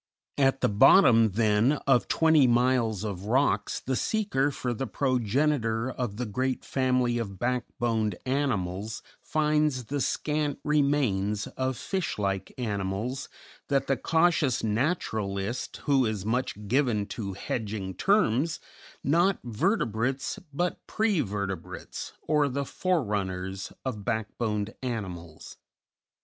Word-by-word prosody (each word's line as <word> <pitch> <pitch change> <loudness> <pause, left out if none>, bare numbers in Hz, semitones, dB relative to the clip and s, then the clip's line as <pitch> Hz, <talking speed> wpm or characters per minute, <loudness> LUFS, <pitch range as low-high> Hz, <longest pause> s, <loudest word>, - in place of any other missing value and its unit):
At 135 -1 +3
the - - +4
bottom, 115 - +6
then, 110 +4 +3
of 135 -3 +3
twenty 160 -4 +4
miles 120 -4 +2
of 100 -3 -4
rocks 130 +6 +1
the 130 - -2
seeker 195 - +1
for 125 -3 -3
the 130 +3 -3
progenitor 125 0 0
of 120 -6 -4
the 125 - -2
great 130 +4 -2
family 125 -2 +1
of 100 -4 -5
backboned 120 -3 -1
animals 110 -7 -1 0.2
finds 150 -4 +1
the 140 +4 -2
scant 150 0 -1
remains 135 -9 +1
of 130 -1 -3
fish 190 -3 -2
like 100 -2 -2
animals 105 +3 -3 0.4
that 140 -1 +1
the 135 - +1
cautious 160 -4 +2
naturalist, 110 - -1
who 135 -4 +3
is 105 -3 -3
much 110 -3 -2
given 120 -4 +2
to 100 -2 -5
"hedging," 100 -1 -4
terms, 165 - +2 0.4
not 175 +7 +3
vertebrates, 125 - -1
but 175 +5 -1
prevertebrates 105 - -2
or 150 -2 +2
the 140 +2 -2
forerunners 100 - -2
of 110 -6 -3
backboned 110 -1 -2
animals. 95 -10 -6
125 Hz, 115 wpm, -28 LUFS, 105-140 Hz, 0.4 s, bottom